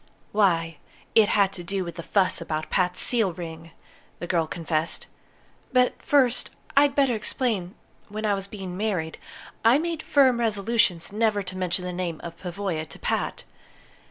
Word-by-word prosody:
"Why, 165 -6 +2 0.3
it 215 -2 +6
had 195 -1 +3
to 175 - -7
do 195 +2 -2
with 170 - -6
the 170 - -6
fuss 185 0 +2
about 155 -2 -4
Pat's 180 -1 +1
seal 225 -7 +2
ring," 165 -1 -8 0.5
the - - -5
girl 170 -2 +1
confessed. 160 -1 -2 0.7
"But 250 -1 +4
first, 260 -5 +3 0.3
I'd 280 0 +5
better 275 -3 +3
explain 215 -4 -2 0.3
that - - -25
when 215 +1 -3
I 210 - +3
was 195 0 -3
being 190 -3 -7
married, 185 -6 -2 0.4
I 230 +4 +6
made 330 0 -2
firm 260 -6 +4
resolutions 210 -5 +2
never 210 -1 +1
to 185 0 -8
mention 185 0 0
the 180 - -4
name 175 -3 -3
of 170 -1 -7
Pavoya 175 -3 -3
to - - -10
Pat. - - -2
195 Hz, 165 wpm, -25 LUFS, 175-225 Hz, 0.7 s, it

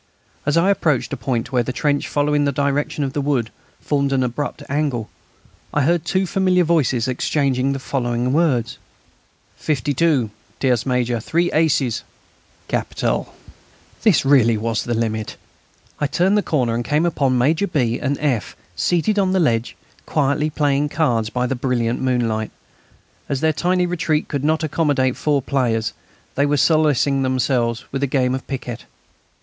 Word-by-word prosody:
As 150 - +2
I 185 +4 +4
approached 155 -9 0
a - - 0
point 120 -1 -2
where 125 -2 +2
the 120 - -3
trench, 145 +2 0
following 145 0 +1
the 140 - +1
direction 140 +2 -1
of 135 -1 -3
the 145 - -1
wood, 135 -6 0 0.3
formed 140 -2 0
an 135 -1 +2
abrupt 145 +4 -3
angle, 140 -6 -2 0.6
I 145 - +3
heard 170 +2 +1
two 190 +3 +1
familiar 185 -1 +2
voices 135 -8 +1
exchanging 135 0 0
the - - -3
following 125 -2 -1
words: 135 -8 +1 0.8
"Fifty 145 -1 -1
two!... 135 -7 +2 0.3
Tierce 125 -2 +1
major...; 125 -2 0
three 170 +9 0
aces!" 140 -7 +1 0.7
"Capital!" - - -2 0.7
This 210 -7 +4
was 135 - +2
really 115 -5 +5
the 115 +2 -2
limit! 110 -1 -2 0.6
I 145 - +1
turned 185 +7 +2
the 210 - +3
corner 130 -11 0
and 120 +1 -1
came 150 +6 +1
upon 140 -6 +1
Major 155 +10 +2
B. 125 -8 0
and 140 -1 -1
F. 135 -8 -1 0.2
seated 190 +5 +1
on 190 -1 +2
the 190 - +2
ledge, 115 -8 +1 0.3
quietly 150 +1 +1
playing 145 -1 +1
cards 120 -9 0
by 125 +2 -1
the 125 - -1
brilliant 120 -2 -1
moonlight. 115 -4 0 0.8
As 140 -2 -1
their 160 0 +2
tiny 180 +3 +1
retreat 170 -3 -1
could 140 -2 -3
not 160 +2 +1
accommodate 145 -5 +1
four 145 -3 0
players, 115 -5 0 0.4
they 140 +1 +1
were 145 0 +1
solacing 145 -3 +3
themselves 130 -3 0
with 135 - -3
a 140 - +1
game 130 -1 +1
of 130 - -5
piquet. 125 -3 -5
140 Hz, 160 wpm, -20 LUFS, 125-155 Hz, 0.8 s, really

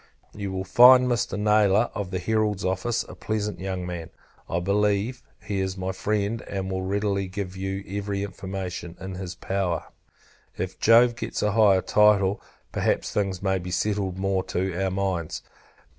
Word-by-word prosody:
You 100 -2 -5
will 95 0 -3
find 125 +6 +7
Mr. 120 -4 0
Nayler, 105 +1 +3
of 100 -4 -4
the 95 - -2
Herald's 105 +1 0
Office, 95 +6 0
a - - -11
pleasant 105 -1 -3
young 95 -1 -3
man. 85 -2 -5 0.4
I 85 - 0
believe, 105 +5 0 0.2
he 100 -2 -2
is 95 0 -2
my 95 0 -2
friend, 105 +3 -1
and 95 -1 -3
will 95 0 -2
readily 100 0 -1
give 95 -1 -5
every 100 +1 -3
information 95 -3 -6
in 95 0 -6
his 90 -1 -6
power. 90 -2 -2 0.7
If - - -4
Jove 115 +1 +6
gets - - -4
a 105 - +2
higher 100 -3 +5
title, 105 -2 +4 0.3
perhaps - - 0
things 95 -2 -1
may 95 -1 +1
be 90 0 -6
settled 95 0 -1
more 95 0 0
to 95 +1 -2
our 95 - +1
minds. 95 -4 -2
95 Hz, 160 wpm, -25 LUFS, 95-105 Hz, 0.7 s, find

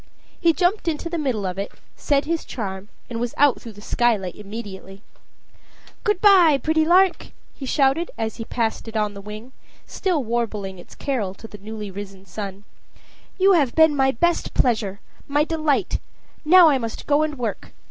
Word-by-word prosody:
He 335 -2 +4
jumped 355 +3 0
into 330 +1 -2
the 340 - -2
middle 250 -9 -1
of 185 +1 -3
it, 200 - -4 0.2
said 285 -1 +1
his 330 +1 -1
charm, 195 -4 -6 0.2
and 230 -2 -5
was 240 0 -3
out 290 -2 +4
through 230 - -9
the 205 - -13
skylight 220 -8 +1
immediately. 200 -2 -9 1.0
"Good 420 -4 +1
by, 365 -8 +6
pretty 315 +3 +1
lark!" 365 +2 +4 0.3
he 270 - -8
shouted, 280 +5 +2
as 220 -1 -3
he 225 - -5
passed 230 -1 -2
it 225 0 -4
on 210 -1 0
the 200 - -9
wing, 215 +5 -9 0.3
still 355 -8 -1
warbling 215 -5 -3
its - - -14
carol 215 -9 -2
to 225 - -11
the 210 - -12
newly 210 0 -7
risen 195 0 -9
sun. 195 +1 -7 0.7
"You 390 0 +5
have 290 -8 +2
been 320 -2 +5
my 265 -1 +3
pleasure, 230 - 0 0.3
my 290 +1 +2
delight; 310 -3 0 0.4
now 340 +1 +8
I 275 -3 +2
must 230 -2 -5
go 290 +1 +3
and 305 -2 -1
work. 230 -5 -4
240 Hz, 175 wpm, -22 LUFS, 210-310 Hz, 1.0 s, now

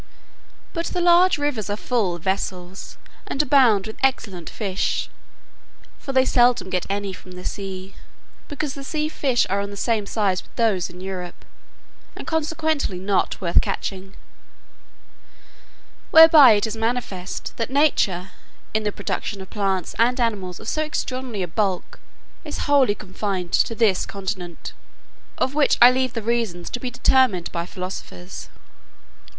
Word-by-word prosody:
But 335 0 -2
the 360 - -2
large 350 +1 +5
rivers 290 -8 -2
are 205 - -2
full 215 -7 0
of 170 - -11
vessels, 190 -1 -4 0.3
and - - -4
abound 255 -9 +4
with 220 - -8
excellent 200 -10 -1
fish; 195 -4 -2 0.9
for 275 - -5
they 260 -1 +4
seldom 240 -7 +3
get 180 -1 -1
any 200 -1 -2
from 185 0 -12
the 180 0 -10
sea, 195 -1 -6 0.5
because 290 -1 -4
the 275 - -8
sea 305 +2 -2
fish 265 -6 +1
are 200 - 0
of 200 - -4
the 200 - -8
same 215 -2 0
size 195 -4 0
with - - -25
those 215 -7 +1
in 180 +1 -12
Europe, 185 -2 -7 0.7
and - - -8
consequently 315 - -1
not 190 +1 0
worth 170 -2 +3
catching; 190 0 -5 1.9
whereby 320 -6 +9
it 205 +1 +1
is 220 0 -4
manifest, 225 -5 -3
that 230 +1 -2
nature, 200 - +1 0.4
in 220 - +1
the 210 -1 -1
production 200 0 -4
of 190 - -10
plants 195 -4 -1
and 245 +3 +3
animals 200 -7 -1
of 220 - -11
so 310 - 0
extraordinary 255 -8 -3
a - - -3
bulk, 190 +1 -2 0.4
is 300 -2 -4
wholly 275 -7 +4
confined 190 -3 -4
to 230 - +2
this 215 -5 +2
continent, 190 -3 -6 0.6
of 260 - 0
which 295 -1 +3
I 245 +1 +9
leave 255 -1 0
the 230 - -4
reasons 215 -7 -2
to 245 - -3
be 250 - -3
determined 245 -7 +2
by 170 0 -3
philosophers. 180 -1 -7
210 Hz, 150 wpm, -22 LUFS, 190-260 Hz, 1.9 s, whereby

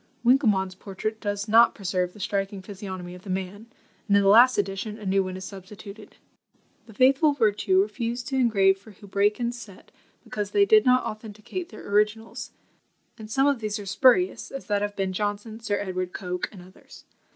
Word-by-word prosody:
Winkelmann's 215 -8 +3
portrait 210 +3 -6
does 205 0 -3
not 230 +2 +5
preserve 185 -3 -2
the - - -15
striking 195 -1 -3
physiognomy 185 -3 -7
of 180 - -11
the 195 - -12
man, 190 +4 -4 0.4
and 200 -1 +4
in 200 - +3
the 195 - +4
last 245 +5 +7
edition 200 +2 -2
a 215 - -10
new 195 0 +2
one 185 0 -5
is 190 - -7
substituted. 200 +2 -11 0.7
The 220 - -13
faithful 270 +5 +4
Vertue 250 - +2
refused 240 - -4
to 270 - -2
engrave 200 -6 +3
for 205 - -16
Houbraken's 210 +4 -1
set, 200 -3 -14 0.3
because 205 -1 -4
they 405 - +4
did 430 +1 +5
not 255 0 +4
authenticate 215 - -7
their 215 - -11
originals; 210 +2 0 0.7
and 215 -1 -9
some 270 +5 +2
of 285 -3 +2
these 215 -1 -3
are 205 - -8
spurious, 255 - +3
as 275 - -7
that 205 -1 0
of 205 0 -3
Ben 190 -1 -2
Jonson, 205 +2 -3
Sir 210 -3 -1
Edward 185 -2 -4
Coke, 180 -2 -4
and 185 -4 -12
others. 185 +1 -17
205 Hz, 185 wpm, -25 LUFS, 195-230 Hz, 0.7 s, last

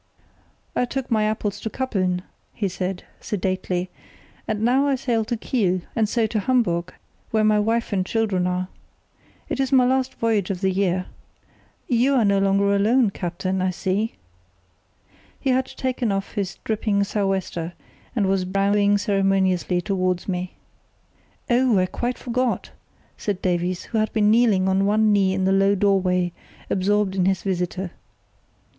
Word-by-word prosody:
"I 250 - +2
took 265 0 -4
my 215 -2 +3
apples 210 -1 -2
to 220 - -4
Kappeln," 185 -8 -1 0.3
he 205 - -1
said, 185 0 -4 0.2
sedately, 185 -2 -2 0.6
"and 215 0 -2
now 260 +4 +3
I 275 - +2
sail 240 -3 0
to 235 +1 -2
Kiel, 190 -6 0
and 220 -2 +1
so 230 -1 +1
to 215 0 -1
Hamburg, 185 -7 0 0.3
where 220 -1 +1
my 215 0 +4
wife 225 +1 0
and 190 -2 +1
children 190 -3 0
are. 180 0 -1 0.8
It - - -3
is 270 0 0
my 260 -2 +5
last 260 +1 +1
voyage 220 -5 0
of 190 -2 -3
the 190 -1 +2
year. 185 -1 0 0.8
You 255 +3 +3
are 240 -4 +3
no 200 -1 +3
longer 200 +1 +2
alone, 220 +2 +3
captain, 185 +1 -3
I 185 - +1
see." 190 +4 -1 1.2
He 270 - 0
had 260 +1 +1
taken 255 -4 -2
off 195 0 -2
his 195 -3 -3
dripping 210 -2 0
sou' 200 0 -1
wester 175 -3 -2 0.4
and 210 -4 +2
was 190 -1 +1
bowing 200 +2 +2
ceremoniously 195 -3 +1
towards 185 -2 -1
me. 180 -1 -3 0.9
"Oh, 245 -2 +3
I 185 - +3
quite 240 +6 -3
forgot!" 250 0 -1 0.5
said 200 -3 -2
Davies, 180 0 0
who 225 - -2
had 215 - 0
been 210 -1 +3
kneeling 215 -5 +4
on 190 +1 +2
one 215 +1 +3
knee 190 -2 +3
in 190 -1 0
the 190 - +3
low 195 +1 +4
doorway, 185 -3 +2 0.4
absorbed 200 0 +1
in 185 -2 +2
his 190 -2 +1
visitor. 180 -1 -2
200 Hz, 160 wpm, -23 LUFS, 185-225 Hz, 1.2 s, my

